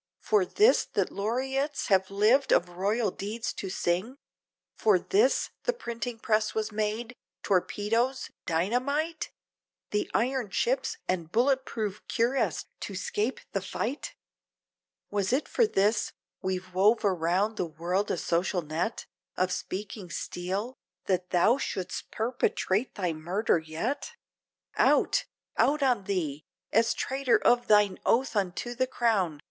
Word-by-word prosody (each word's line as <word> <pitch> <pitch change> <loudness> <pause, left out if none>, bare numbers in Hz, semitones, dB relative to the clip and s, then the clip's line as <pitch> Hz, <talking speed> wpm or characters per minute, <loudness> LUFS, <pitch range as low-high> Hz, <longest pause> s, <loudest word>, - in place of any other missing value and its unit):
For 210 -4 +2
this! 425 - +4
that - - +1
laureates 265 +7 -1
have 190 -1 +3
lived 215 +8 +3
of 175 - +4
royal 200 +4 0
deeds 215 +5 -4
to 195 - -5
sing? 185 +8 -1 0.6
For 210 -4 +4
this! 410 - +2
the - - +2
printing 235 - -5
press 215 -1 +1
was 220 0 -1
made, 215 +3 -2 0.3
torpedoes, 225 +7 0 0.2
dynamite? 255 - 0 0.6
The 210 - 0
iron 250 -2 0
ships, 265 +7 0
and 170 -3 -2
bullet 265 +4 +2
proof 215 -2 -3
cuirass 245 +4 +1
to 200 - -6
scape 210 +6 -2
the 195 - -1
fight? 240 +8 -4 1.0
Was 200 -1 0
it 265 +4 +1
for 465 - +3
this! 205 - +1 0.3
we've 185 -1 -3
wove 210 +5 +4
around 190 +3 +1
the 175 - -1
world 175 +6 -1
a - - 0
social 175 +2 0
net 160 +9 -2 0.3
Of 185 0 +1
speaking 195 0 -5
steel, 190 +8 -3 0.3
that 180 -2 0
thou 215 +9 +4
should'st 185 -8 -4
perpetrate 225 -1 0
thy 180 -5 -1
murder 175 +5 +1
yet? 190 - -3 0.6
Out! - - +3 0.3
out 295 0 +3
on 245 -7 +2
thee! 155 -7 -2 0.3
as 225 +1 +3
traitor 265 -2 +2
of 240 0 +3
thine 210 -2 +4
oath 250 +1 +2
unto 200 +4 -1
the 255 +2 0
crown! 205 - +1
210 Hz, 130 wpm, -28 LUFS, 185-245 Hz, 1.0 s, this